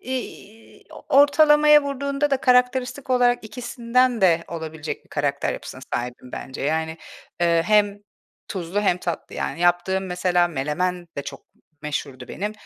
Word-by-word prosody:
iii, 225 -4 -8 0.2
ortalamaya 295 +1 +6
vurduğunda 280 +1 -2
da 275 - +3
karakteristik 250 +1 +1
olarak 245 -2 +3
ikisinden 245 +1 0
de 170 -3 +3
olabilecek 160 -2 -6
bir - - -27
karakter - - -1
yapısına - - -8
sahibim 125 +1 -5
bence. 135 0 -7
Yani, 160 +2 -1 0.4
eee, 170 -1 +3
hem 205 -1 +3 0.5
tuzlu 185 +1 -3
hem 180 -3 +1
tatlı 170 -2 -5
yani. 170 - -4
Yaptığım 175 +2 +1
mesela 180 -1 +1
menemen 175 +5 -2
de 140 - -3
çok 135 0 -9 0.4
meşhurdu 135 -4 -5
benim. 210 +2 -4
190 Hz, 135 wpm, -23 LUFS, 165-250 Hz, 0.5 s, ortalamaya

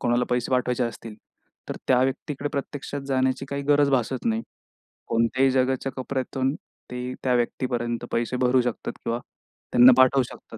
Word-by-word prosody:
कोणाला 120 +1 +1
पैसे 125 0 0
पाठवायचे 125 -1 +1
असतील 115 -2 -7 0.5
तर - - -4
त्या 125 -1 +5
व्यक्तीकडे 140 +2 -2
प्रत्यक्षात 140 0 -4
जाण्याची 130 0 +1
काही 140 0 -3
गरज 145 0 +3
भासत 130 -1 0
नाही. 115 0 0 0.7
कोणत्याही 130 +4 +2
जगाच्या 130 +1 0
कोपऱ्यातून 130 +1 -2 0.4
ते 125 0 -4
त्या 125 -1 +2
व्यक्तीपर्यंत 120 -1 -1
पैसे 120 +2 -1
भरू 125 0 +3
शकतात 120 -2 -3
किंवा 115 +1 -1 0.5
त्यांना 125 +2 +8
पाठवू 130 0 +5
शकतात. 115 -1 -11
130 Hz, 150 wpm, -25 LUFS, 120-135 Hz, 0.7 s, त्यांना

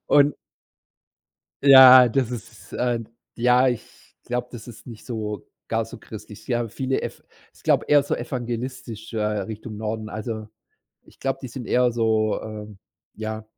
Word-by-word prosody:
und 145 0 +5 1.3
Ja, 130 -2 +10
das 125 0 0
ist 120 -3 -9
äh, 120 -1 0 0.4
ja, 125 +2 +4
ich 120 -3 -7
glaube, 125 0 -3
das 115 -3 -10
ist 120 -3 -12
nicht 115 -4 -11
so 110 -4 -5 0.2
gar - - 0
so - - -11
christlich. - - -11
Ja, 120 -1 0
viele 130 +4 -2
Ev - - -6 0.3
ich - - -21
glaube - - +2
eher 145 -1 +6
so 140 - -1
evangelistisch 120 -2 -5
äh, 110 - -2
Richtung 105 +1 -4
Norden 110 0 -4
also 110 0 -5 0.6
ich - - -21
glaube, 135 0 -1
die 130 - -5
sind 120 0 -7
eher 125 -1 +3
so 110 -2 +1
ähm, 105 -2 -8 0.4
ja. 110 0 -5
120 Hz, 155 wpm, -24 LUFS, 110-125 Hz, 1.3 s, Ja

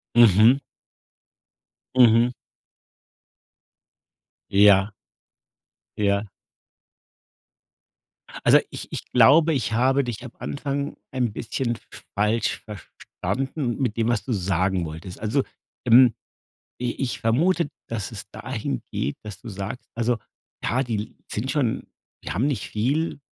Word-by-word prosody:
Mhm. 115 +2 +7 1.4
Mhm. 120 0 +6 2.2
Ja. 100 0 +6 1.1
Ja. 100 0 +1 2.2
Also, - - +7
ich - - -7
ich - - -5
glaube, 150 +7 +6
ich 120 -4 -1
habe 135 +4 +3
dich 120 0 -5
am 125 - -8
Anfang 140 0 -3
ein 125 -4 0
bisschen 120 +2 -2 0.4
falsch 105 +2 +1
verstanden 125 - -4
mit 115 -4 -1
dem, 115 0 +1
was 120 -3 +1
du 130 - -5
sagen 95 -2 0
wolltest. 80 +4 -8
Also, 110 +6 0 0.4
ähm, 120 -1 +7 0.7
i 125 -1 -1
ich 130 -3 -2
vermute, 160 +8 +2 0.2
dass 110 -1 -3
es 100 -3 -8
dahin 110 - -4
geht, 70 - -2
dass 105 -3 -9
du - - -10
sagst 100 +4 -6
also, 115 0 0 0.5
ja, 130 +4 +1
die 110 -4 -4
sind 120 +6 -2
schon 135 -7 0 0.4
die - - -5
haben 110 - +1
nicht 130 -9 -2
viel. 140 +9 -1
115 Hz, 115 wpm, -24 LUFS, 105-130 Hz, 2.2 s, Mhm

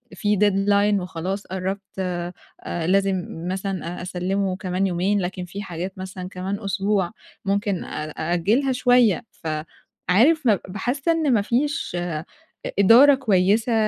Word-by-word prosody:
في 210 -2 +1
deadline 205 0 +3
وخلاص 185 +3 -4
قرّبت 190 +2 -3 0.2
آآ 175 -1 -3 0.5
لازم 195 -1 +2 0.3
مثلًا 185 -2 -4
أ - - -6
أسلِّمه 185 +1 -1
كمان 190 0 -1
يومين، 190 +3 +1
لكن 180 0 -4
في 195 +3 -7
حاجات 180 +1 -6
مثلًا 185 -1 -6
كمان 190 +2 -4
أسبوع 195 -1 0 0.3
ممكن 200 -1 0
أ 155 0 -5
أأجِّلها 195 - +1
شويّة. 245 -3 +3
فعارف 180 - 0
ما 210 -5 +4
باحس 245 - -3
إن 320 -5 +3
ما 210 - +3
فيش 270 +7 -1
إ 170 -3 -3 0.6
إدارة 250 +8 +8
كويّسة 215 -1 +2
195 Hz, 130 wpm, -23 LUFS, 180-210 Hz, 0.6 s, إدارة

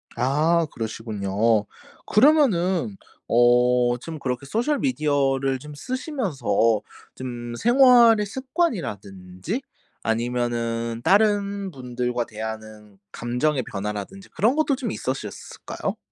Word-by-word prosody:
아 155 +6 +2
그러시군요. 110 -1 -1 0.4
그러면은 190 - +3 0.3
어 120 +1 +4
좀 160 +3 -7
그렇게 125 0 -3
소셜 245 - 0
미디어를 135 - +1
좀 150 +3 -10
쓰시면서 150 - 0 0.3
좀 120 -2 -6
생활의 240 - +6
습관이라든지 180 - -3 0.4
아니면은 115 0 -1
다른 200 0 +2
분들과 125 -3 -3
대하는 110 -2 -8
감정의 125 +3 -1
변화라든지 105 - -6
그런 230 +6 +1
것도 305 -2 +2
좀 250 -5 -4
있으셨을까요? 130 +1 -5
130 Hz, 250 characters per minute, -24 LUFS, -, 0.4 s, 생활의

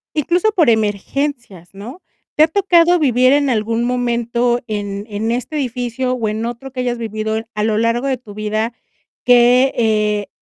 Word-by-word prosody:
Incluso 350 +8 +1
por 340 - +3
emergencias, 220 - -2
¿no? 230 - -10 0.3
¿Te 305 - +5
ha - - +5
tocado 350 -1 +3
vivir 255 -3 +3
en 285 -1 +2
algún 230 0 0
momento 240 0 0
en 205 -2 -4
en 215 +2 -2
este 250 +6 -3
edificio 250 -1 -2
o 230 -4 -2
en 220 +2 -3
otro 240 +3 -6
que 255 - -7
hayas 245 -1 -1
vivido 220 -1 -3
a 210 - -2
lo 215 -1 +1
largo 230 +4 0
de 265 -1 0
tu 225 -4 -13
vida 215 +2 -2 0.5
que, 245 +2 +5
eh, 210 -2 +1
240 Hz, 165 wpm, -17 LUFS, 215-260 Hz, 0.5 s, Te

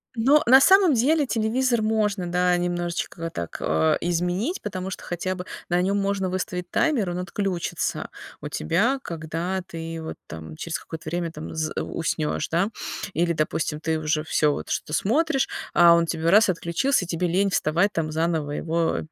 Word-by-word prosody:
Ну, 270 +6 +4
на 260 +3 +8
самом 380 -2 +6
деле 290 +6 +3
телевизор 235 +1 +1
можно, 210 -4 0
да, 180 0 +3
немножечко 175 -1 -2
так, 85 - -5
э, 80 +1 +2
изменить, 180 - -1
потому 190 -2 -4
что 190 - -7
хотя 180 +2 -3
бы 180 0 -7 0.2
на 175 0 +2
нём 195 +2 +1
можно 195 -1 0
выставить 180 -1 -3
таймер, 255 - +1
он 175 0 -3
отключится 180 -1 -2 0.3
у - - -5
тебя, 235 - +1
когда 170 +3 -3
ты 165 -2 -6
вот 160 - -6
там 80 -1 -8
через 170 - -4
какое-то 160 -1 -8
время 170 0 -2
там 155 -1 -8
з 155 -1 -2
уснёшь, 155 -2 -2
да. 175 +5 +1 0.4
Или, 170 0 +1
допустим, 155 -1 -1
ты 160 0 -1
уже 155 0 0
всё 150 -1 +2
вот, - - -6
что 150 - -3
смотришь, 270 - +1 0.3
а 170 -1 +7
он 170 0 +3
тебе 165 0 -1
раз, 210 +2 +6
отключился, 180 +6 +1
и - - -13
тебе 175 +1 -1
лень 195 +4 +2
вставать 175 +4 +1
там 155 -2 -1
заново 160 -2 -1
его 165 +2 0
175 Hz, 175 wpm, -24 LUFS, 165-205 Hz, 0.4 s, на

